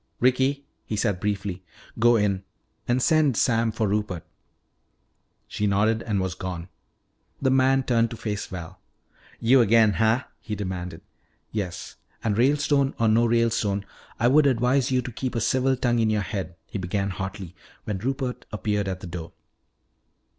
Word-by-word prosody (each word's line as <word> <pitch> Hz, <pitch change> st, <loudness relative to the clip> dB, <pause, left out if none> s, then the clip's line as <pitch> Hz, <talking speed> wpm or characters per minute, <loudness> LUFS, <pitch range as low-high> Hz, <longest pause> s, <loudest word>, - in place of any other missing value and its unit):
"Ricky," 130 Hz, +3 st, +2 dB, 0.2 s
he 110 Hz, -, -4 dB
said 100 Hz, -3 st, 0 dB
briefly, 100 Hz, -2 st, -3 dB, 0.4 s
"go 120 Hz, +1 st, +5 dB
in. 100 Hz, -3 st, +1 dB, 0.4 s
And 120 Hz, +1 st, +2 dB
send 155 Hz, -7 st, +3 dB
Sam 115 Hz, -1 st, +2 dB
for 110 Hz, 0 st, -1 dB
Rupert." 100 Hz, -4 st, -2 dB, 1.2 s
She 105 Hz, -, -1 dB
nodded 110 Hz, +3 st, +2 dB
and 105 Hz, -4 st, -1 dB
was 95 Hz, -1 st, -1 dB
gone. 90 Hz, -1 st, -6 dB, 0.7 s
The 135 Hz, -1 st, +2 dB
man 135 Hz, 0 st, +4 dB
turned 115 Hz, -2 st, +2 dB
to 115 Hz, -, -7 dB
face 105 Hz, -2 st, -3 dB
Val. 85 Hz, -3 st, -8 dB, 0.6 s
"You 125 Hz, +3 st, +5 dB
again, 110 Hz, -1 st, +5 dB
huh?" 110 Hz, +6 st, +2 dB, 0.2 s
he 110 Hz, -, -5 dB
demanded. 90 Hz, -4 st, -5 dB, 0.5 s
"Yes. 95 Hz, -5 st, -5 dB, 0.3 s
And 110 Hz, -3 st, +1 dB
Ralestone 140 Hz, +2 st, +2 dB
or 115 Hz, -, +3 dB
no 115 Hz, +2 st, +4 dB
Ralestone, 115 Hz, -4 st, +1 dB, 0.3 s
I 120 Hz, -, +3 dB
would 145 Hz, +3 st, +5 dB
advise 125 Hz, +1 st, +2 dB
you 130 Hz, -1 st, +1 dB
to 125 Hz, -, -6 dB
keep 130 Hz, +2 st, -4 dB
a -, -, +1 dB
civil 130 Hz, +3 st, +2 dB
tongue 120 Hz, -1 st, +1 dB
in 110 Hz, -1 st, +2 dB
your 105 Hz, -2 st, +1 dB
head," 95 Hz, -5 st, -4 dB
he 110 Hz, -, -6 dB
began 100 Hz, +2 st, -1 dB
hotly, 95 Hz, -1 st, -6 dB, 0.3 s
when 105 Hz, -3 st, -3 dB
Rupert 130 Hz, +2 st, -3 dB
appeared 105 Hz, -2 st, -1 dB
at 95 Hz, -1 st, -4 dB
the -, -, -7 dB
door. 85 Hz, -1 st, -7 dB
110 Hz, 160 wpm, -25 LUFS, 100-125 Hz, 1.2 s, go